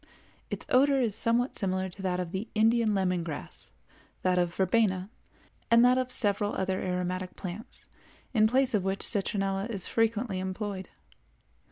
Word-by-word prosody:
Its - - -4
odor 275 +2 +4
is 235 -5 +1
somewhat 235 +4 +1
similar 190 -2 0
to 190 +2 -10
that 180 -1 -1
of 180 -2 -4
the 195 +5 -4
Indian 220 0 +3
lemon 180 -3 0
grass, 160 -3 -7 0.5
that 180 -1 +2
of 175 -1 +1
verbena, 190 0 +1 0.6
and 235 +1 +6
that 250 +1 +4
of 255 -1 -2
several 205 -3 +1
other 190 0 -1
aromatic 180 0 -3
plants, 190 +4 -8 0.5
in 215 -3 +5
place 260 +2 +3
of 205 -3 +1
which 195 +1 -2
citronella 195 0 0
is 200 -6 -2
frequently 225 -3 0
employed. 190 0 -4
195 Hz, 155 wpm, -29 LUFS, 185-230 Hz, 0.6 s, and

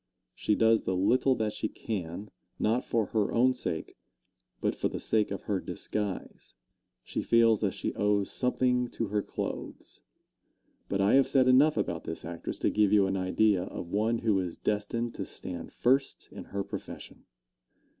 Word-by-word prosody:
She 105 - 0
does 115 0 +4
the 95 - 0
little 125 +8 +3
that 110 -2 -1
she 110 - -3
can, 100 -1 -5 0.3
not 115 +4 +1
for 115 -2 0
her 105 -3 +1
own 125 +2 +4
sake, 85 -10 -5 0.6
but - - 0
for - - 0
the - - -5
sake 110 -2 +1
of 100 - -5
her 100 -2 -1
disguise 105 +1 -5 0.5
she - - -3
feels 115 -2 +4
that - - 0
she - - -3
owes 105 -1 +1
something 125 -1 +1
to 115 -3 -4
her 105 0 +1
clothes. - - -6 0.9
But 100 0 0
I 100 - +4
have 135 -1 +5
said 130 -1 +4
enough 135 +3 +5
about 85 -5 -2
this 80 - -5
actress 85 0 -5
to - - +2
give 105 -2 +3
you 105 -2 +5
an 95 0 -1
idea 95 +1 +2
of 85 - -7
one 110 +3 +1
who 110 -4 +1
is 90 -3 -4
destined 115 +3 -2
to - - -5
stand 85 -2 -6
first 135 +2 +1
in - - -9
her 100 0 -3
profession. - - -9
105 Hz, 175 wpm, -29 LUFS, 95-115 Hz, 0.9 s, have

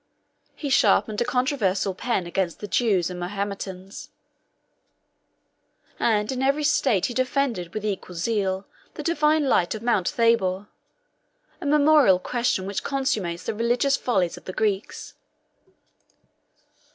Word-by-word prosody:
He 285 -3 -4
sharpened 220 -3 +3
a - - +2
controversial 235 -8 0
pen 195 -1 -2
against 175 0 -2
the 210 - -6
Jews 195 -6 +1
and 180 - -6
Mahometans; 195 0 -5 1.9
38 - - -4
and 210 0 +1
in 260 0 -3
every 280 +3 +1
state 265 -9 +2
he 245 - -3
defended 255 -8 -1
with 215 -1 -3
equal 190 -3 -4
zeal 195 0 -1 0.3
the - - -6
divine 310 -2 +2
light 180 -6 +2
of 220 - -8
Mount 215 -7 +1
Thabor, 205 -4 +1 0.9
a 305 - -3
memorable 295 -8 +5
question 235 -1 -1
which 200 0 -3
consummates 205 -11 -2
the - - -3
religious 240 +5 +1
follies 190 -11 0
of - - -14
the 185 - -6
Greeks. 205 -1 -2
215 Hz, 130 wpm, -24 LUFS, 190-255 Hz, 1.9 s, memorable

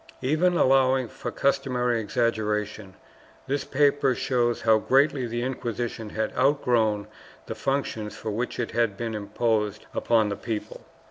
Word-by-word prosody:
Even 165 +6 +2
allowing 130 -2 +3
for - - -6
customary 125 -4 0
exaggeration, 105 -3 -1 0.5
this 140 +1 -1
paper 140 -2 +2
shows 120 -2 0
how 110 -1 +4
greatly 135 +1 +2
the 120 +1 -3
Inquisition 120 -3 -4
had 110 +1 -2
outgrown 120 -6 +2 0.4
the - - -5
functions 135 -6 -2
for 110 - -4
which 120 +5 -3
it 120 - -2
had 115 -4 0
been 115 -1 -3
imposed 105 0 -1
upon 110 -3 +2
the 100 - -2
people. 110 -1 -5
120 Hz, 135 wpm, -26 LUFS, 110-130 Hz, 0.5 s, how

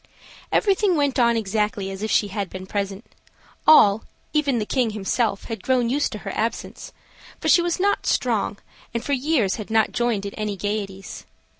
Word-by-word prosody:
Everything 395 -2 +3
went 285 -3 +1
on 235 -1 +4
exactly 210 -2 -1
as 195 +1 -7
if 215 - -2
she 205 - +2
had 200 -2 -3
been 185 0 -7
present. 200 +2 -4 0.6
All, 215 -9 +7 0.3
even 285 -5 +2
the 215 - -1
king 250 0 +1
himself, 210 0 -1
had 225 -4 -6
grown 250 -1 +1
used 285 +2 0
to - - -4
her 195 - -3
absence; 230 +1 -3 0.5
for - - -3
she 350 - +6
was 345 0 -1
not 405 +2 +1
strong, 220 -4 0 0.4
and 235 - -1
for 285 - 0
years 260 -7 +1
had 215 -1 -7
not 220 -1 +2
joined 235 -4 0
in 200 - -5
any 210 -2 -3
gayeties. 200 -1 -5
220 Hz, 180 wpm, -23 LUFS, 200-260 Hz, 0.6 s, All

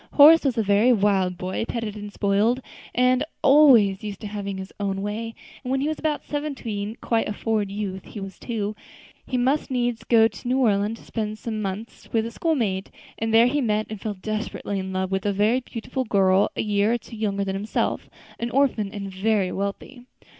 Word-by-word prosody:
Horace 310 +3 +8
was 265 -5 0
a 225 - +2
very 205 +4 +4
wild 195 -5 +2
boy, 185 +4 -3
petted 225 -3 -3
and 205 -1 -7
spoiled, 205 +5 +2 0.4
and 250 +2 +3 0.2
always 245 -9 +6
used 205 -2 -5
to - - -7
having 200 -1 -4
his 190 0 -8
own 195 -1 -2
way; 225 +2 -4 0.3
and 250 - -5
when 265 +1 +1
he 280 - 0
was 310 -1 -2
about 305 -2 -1
seventeen 235 -8 -4
quite 225 -2 0
a - - -2
forward 215 -1 -1
youth 195 -2 -4
he 210 - -8
was 195 -1 -8
too 215 -3 -3 0.5
he 255 - -1
must 265 +5 +1
needs 245 -3 -1
go 225 -2 +5
to 240 - -10
New 255 +2 +2
Orleans 215 -3 +2
to - - -16
spend 215 -2 -3
some 220 -1 -4
months 205 +3 -6
with 225 -1 +1
a 230 - -5
schoolmate; 225 - -1 0.3
and 225 0 -1
there 225 +1 +6
he 285 +4 +1
met, 215 -3 +1
and 215 -3 -6
fell 215 -2 -3
desperately 210 0 -3
in 190 0 -4
love 190 0 -2
with, 190 0 0
a - - +2
very 210 +5 +2
beautiful 255 +1 -4
girl 195 -3 +3
a - - -1
year 210 +1 +2
or - - +2
two 230 0 -12
younger 200 -2 -1
than 190 - -2
himself, 205 +3 -2 0.3
an 235 - -2
orphan 240 -6 +1
and 200 -2 -6
very 195 -1 +1
wealthy. 200 +6 -4
215 Hz, 205 wpm, -24 LUFS, 200-240 Hz, 0.5 s, Horace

